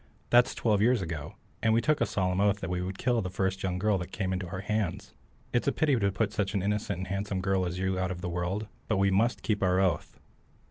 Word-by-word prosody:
That's 120 0 +5
twelve 105 -3 +2
years 120 -2 +3
ago, 80 -3 -5 0.3
and 110 -1 +3
we - - +5
took 155 +3 +1
a 115 - +3
solemn 95 -2 0
oath 100 0 +3
that 90 - -3
we 90 0 -1
would 95 +1 -4
kill 120 -2 +1
the 90 - -3
first 95 0 -1
young 90 -1 -1
girl 100 0 +2
that 90 - -6
came 95 -2 -2
into 90 -1 -3
our 95 +2 -5
hands. 100 -1 -2 0.4
It's 120 - +1
a - - +5
pity 145 -2 +2
to 100 -4 +1
put 95 - -1
such 100 0 -1
an 95 - 0
innocent 105 -2 -1
and 95 - -4
handsome 100 0 -2
girl 95 -1 +1
as 90 +1 -4
you 95 0 0
are - - 0
out 95 - 0
of 90 -2 -5
the 90 - -3
world, 90 +5 -2 0.2
but 105 - +1
we 100 0 +3
must 115 +5 +1
keep 105 -2 0
our 90 -1 +3
oath." 90 -5 0
95 Hz, 265 wpm, -29 LUFS, 90-105 Hz, 0.4 s, That's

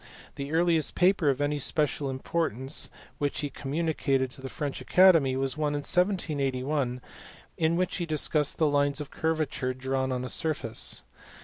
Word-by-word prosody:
The 140 +1 -6
earliest 165 -2 +2
paper 180 -4 +3
of 135 +1 0
any 145 0 0
special 145 0 0
importance 135 -1 -2 0.3
which 145 0 -1
he 145 -2 -3
communicated 140 -3 -1
to 130 - -8
the 130 - -6
French 145 -2 -4
Academy 165 -8 +5
was 135 +1 0
one 150 -1 0
in 145 - -2
1781 140 -8 0 0.5
in 160 +1 +1
which 180 +1 0
he 175 -2 -3
discussed 150 -1 +1
the 160 - +3
lines 145 -1 +2
of 150 - -6
curvature 155 -5 -1
drawn 130 0 -1
on 125 0 -2
a - - -5
surface. 140 -8 -1
145 Hz, 155 wpm, -28 LUFS, 135-160 Hz, 0.5 s, Academy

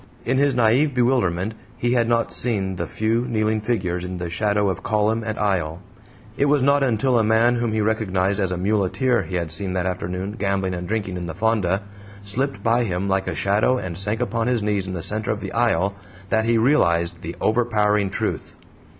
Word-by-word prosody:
In 130 +3 +1
his 140 -2 +3
naive 125 +5 +3
bewilderment 115 -6 +1 0.2
he 120 0 0
had 120 -2 +2
not 115 0 +1
seen 95 -6 -1
the - - -3
few 115 +3 0
kneeling 110 -2 0
figures 90 -6 -1
in 90 0 -5
the 85 -1 -5
shadow 105 +1 +1
of 95 - -2
column 110 +1 0
and 110 -1 -3
aisle; 90 -6 -1 0.6
it 140 - +2
was 145 -2 +3
not 140 +1 +4
until 125 -1 +2
a - - +3
man, 115 +3 +3
whom 120 -1 -1
he 110 0 0
recognized 100 -3 0
as 95 -2 0
a 90 - -2
muleteer 105 +5 +1
he 90 0 -6
had 85 -3 -2
seen 90 +3 -3
that 90 -1 -1
afternoon 90 +1 -3
gambling 100 -2 0
and 90 0 -5
drinking 100 -4 -2
in 90 -1 -5
the 80 - -6
fonda, 100 -2 +1 0.4
slipped 110 +2 -1
by 115 +2 +3
him 95 -2 -2
like 95 0 0
a - - -2
shadow 105 +6 +2
and 95 -7 -5
sank 105 +4 -1
upon 115 0 -1
his 120 -4 +1
knees 100 -2 0
in 95 - -4
the 85 - -3
center 110 +3 -1
of 110 - 0
the - - -6
aisle 100 -5 +1 0.4
that 110 0 +2
he 115 0 +3
realized 85 - +2
the - - -6
overpowering 105 -3 +2
truth. 95 - -3
105 Hz, 205 wpm, -22 LUFS, 95-115 Hz, 0.6 s, not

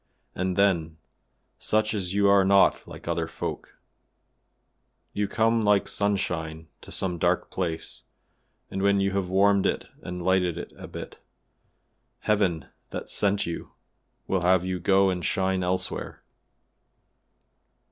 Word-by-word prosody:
And 95 0 -1
then, 85 -5 +2 0.6
such 110 0 +1
as 95 -4 -2
you 100 0 +4
are 100 -1 +6
not 100 +1 +4
like - - -11
other - - -1
folk; - - -6 1.4
you 105 0 0
come 115 +2 +2
like 105 -1 +3
sunshine 80 -6 -1
to - - -12
some 90 -3 -2
dark - - +1
place, 85 -4 -3 0.7
and 95 - -3
when 100 0 +3
you 100 0 +1
have 95 -2 -1
warmed 100 +1 +4
it - - -1 0.2
and 90 0 -6
lighted 90 -2 +2
it - - -7
a - - -9
bit, - - -9 1.0
Heaven, 100 -6 +1 0.2
that - - -6
sent 100 0 +1
you, 85 - -6 0.5
will 95 -2 0
have 90 0 +3
you 95 -1 -2
go 95 +1 +4
and 90 -1 -3
shine 95 0 0
elsewhere. 90 +1 -2
95 Hz, 135 wpm, -26 LUFS, 90-100 Hz, 1.4 s, are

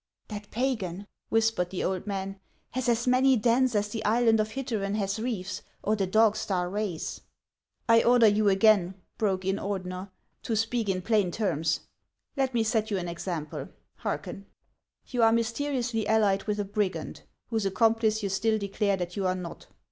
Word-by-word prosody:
" - - -64
" - - -50
That 205 -1 -7
pagan," 210 -7 -2 0.2
whispered 225 -5 +2
the 185 - -3
old 190 +1 -2
man, 195 -1 -4 0.2
" - - -42
has 255 0 -1
as 235 0 +1
many 255 +1 +4
dens 240 +2 +2
as 205 0 +1
the 220 +1 -4
island 225 +1 +3
of 215 0 +1
Hittereu 220 -7 -2
has 200 0 -1
reefs, 215 -5 -3 0.2
or 215 - +2
the 195 -3 -1
dog 215 +2 +4
star 180 -2 -1
rays." 200 -5 -3 0.3
" - - -50
I 230 0 +6
order 240 -1 +5
you 210 0 +4
again," 195 -2 +4 0.2
broke 190 -3 0
in 195 +1 +1
Ordener, 185 -1 -4 0.2
" - - -47
to 225 - -2
speak 225 0 0
in 185 -1 -1
plain 210 -4 +2
terms. 165 -6 0 0.5
Let 265 -3 0
me 230 - +3
set 220 -1 0
you 200 - 0
an 175 -1 -3
example; 170 -3 -4 0.3
hearken. 195 0 -4 0.6
You 245 - -2
are 225 0 +6
mysteriously 230 -1 -1
allied 205 -3 +2
with 210 -1 -1
a 205 - 0
brigand, 200 -1 -2 0.3
whose 220 -4 0
accomplice 220 +2 +2
you 200 - 0
still 220 +3 +1
declare 200 -1 0
that 175 -1 -4
you 195 -2 0
are 185 - +1
not. 180 -2 -8
210 Hz, 185 wpm, -28 LUFS, 190-225 Hz, 0.6 s, I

